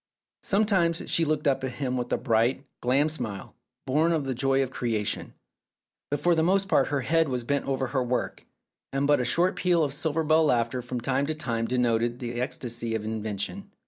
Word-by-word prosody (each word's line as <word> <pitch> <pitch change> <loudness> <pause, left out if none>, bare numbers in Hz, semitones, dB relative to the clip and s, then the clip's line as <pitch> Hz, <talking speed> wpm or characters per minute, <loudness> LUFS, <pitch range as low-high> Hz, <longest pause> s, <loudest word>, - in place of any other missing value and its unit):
Sometimes 195 -5 +2
she 165 - +3
looked 150 -1 0
up 135 -1 +1
at 130 -2 -3
him 130 -2 -2
with 125 -1 -3
a - - +2
bright, 120 +3 +1 0.2
glad 140 +5 +2
smile, 105 -10 -5 0.3
born 155 +6 +2
of 155 -4 -1
the 135 - -1
joy 135 +2 +2
of 130 - -5
creation; 110 -5 -2 0.7
but 145 - -1
for 175 +4 +3
the 160 - +2
most 190 +4 +2
part 140 -7 +3
her 145 -1 -1
head 160 +4 +2
was 125 -2 -1
bent 140 +3 -1
over 135 -1 0
her 130 +1 -1
work, 125 0 -2 0.5
and 135 +1 0
but 145 -1 +4
a - - 0
short 170 +9 +2
peal 175 -3 +2
of 140 -2 -1
silver 160 +2 -1
bell 160 +1 +4
laughter 120 -2 +1
from 125 0 -5
time 135 +3 0
to 155 - -1
time 115 -6 -2
denoted 120 -1 +1
the 120 -1 -4
ecstasy 120 -3 -3
of 110 -1 -3
invention. 110 - -4
135 Hz, 205 wpm, -27 LUFS, 120-155 Hz, 0.7 s, but